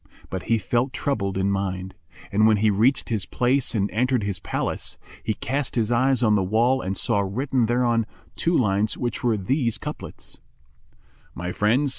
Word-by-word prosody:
But 95 0 -3
he 115 - +4
felt 120 +5 0
troubled 100 -9 -1
in 95 +1 +1
mind; 95 -1 -2 0.4
and 110 +2 +4
when 110 -1 +4
he 105 +1 +3
reached 115 +7 +2
his 110 -5 -1
place 125 0 +1
and 100 -2 +2
entered 125 0 +1
his 100 -2 -2
palace, - - -3 0.2
he 110 - -2
cast 140 +1 -2
his 115 -1 +1
eyes 130 +1 +3
on 110 -2 +4
the 105 - +3
wall 115 +7 +2
and 95 +1 -3
saw 115 -4 +1
written 120 +5 0
thereon 120 -2 +2 0.3
two 170 0 +1
lines 105 -2 +1
which 120 -1 -3
were 115 -3 +2
these 115 +4 0
couplets, - - -8 1.0
"My 90 +1 -4
friends! 120 +10 +2
110 Hz, 175 wpm, -24 LUFS, 100-125 Hz, 1.0 s, he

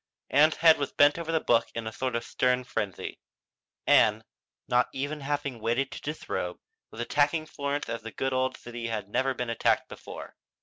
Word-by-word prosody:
Ann's 155 +3 +5
head 160 -2 +6
was 140 - -2
bent 145 +3 +5
over 165 -1 -3
the 160 - +2
book 120 -6 +3
in 115 -1 -3
a 110 - -3
sort 130 +2 -2
of 115 - -1
stern 125 0 +1
frenzy. 110 -6 -4 0.7
Ann, - - +5 0.4
not 125 0 +3
even 145 +3 -3
having 140 -3 -2
waited 120 +5 0
to - - -7
disrobe, 145 - -4 0.3
was 110 - -12
attacking 145 +5 +1
Florence 145 -1 -3
as 115 0 -4
the 115 - -7
good 130 +3 -2
old 130 0 0
city 120 -1 -6
had 105 -3 -3
never 130 +4 +1
been 125 -2 -2
attacked 115 - +1
before. - - -9
130 Hz, 185 wpm, -28 LUFS, 115-145 Hz, 0.7 s, head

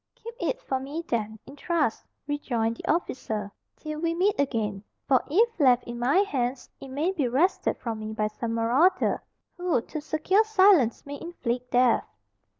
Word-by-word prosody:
"Keep 465 +1 -9
it - - -1
for 265 - -1
me 285 +5 -5
then, 220 -2 -2
in 275 - -12
trust," 300 -6 -1 0.2
rejoined 240 -6 -1
the - - -1
officer, 220 - -2 0.2
"till 305 0 -6
we 335 +1 0
meet 390 +4 +3
again; 215 -8 -1 0.2
for 260 -3 +4
if 450 +6 +2
left 255 -4 +5
in 240 0 -7
my 255 +8 +2
hands, 255 -8 -3
it 275 - -9
may 290 +7 -1
be 305 -9 0
wrested 290 +11 +1
from 225 -2 -4
me 215 0 -5
by 215 -1 -1
some 225 +2 -3
marauder, 270 +12 +2 0.4
who 355 -7 +1
to 305 +6 -6
secure 315 +7 +2
silence 380 - +4
may 285 0 -7
inflict 250 -7 -4
death." 250 -1 +3
275 Hz, 170 wpm, -26 LUFS, 235-340 Hz, 0.4 s, left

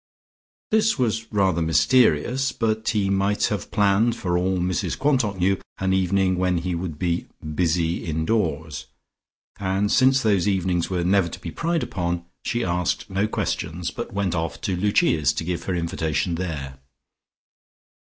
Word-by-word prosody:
This 220 +1 +3
was 115 -3 -1
rather 95 -5 +2
mysterious, 125 - +3
but 110 -2 -1
he 105 -4 +1
might 100 +1 +1
have 105 - -5
planned, 105 +2 +2
for 90 -2 -2
all 90 +1 +1
Mrs 90 +1 -1
Quantock 130 -8 +1
knew, 95 +1 +1 0.2
an 95 0 0
evening 95 0 +2
when 90 -1 +1
he 90 +2 -2
would 85 -3 -4
be 85 +1 -1 0.3
"busy 85 0 0
indoors," 80 -3 -1 0.7
and 95 +1 0
since 130 +1 +5
those 105 -3 +2
evenings 95 -3 0
were 90 -2 -1
never 90 -1 +3
to - - -8
be - - -6
pried 170 -1 -1
upon, 85 -2 -3 0.2
she 120 0 -1
asked 90 +3 -1
no 95 +2 +1
questions, 85 -4 -3
but 120 - -6
went 100 -3 -1
off 80 -2 -2
to 100 -6 -1
Lucia's 95 - +2
to 75 - -3
give 85 0 -3
her 95 - -1
invitation 85 0 -1
there. 75 -7 -4
95 Hz, 155 wpm, -23 LUFS, 85-105 Hz, 0.7 s, since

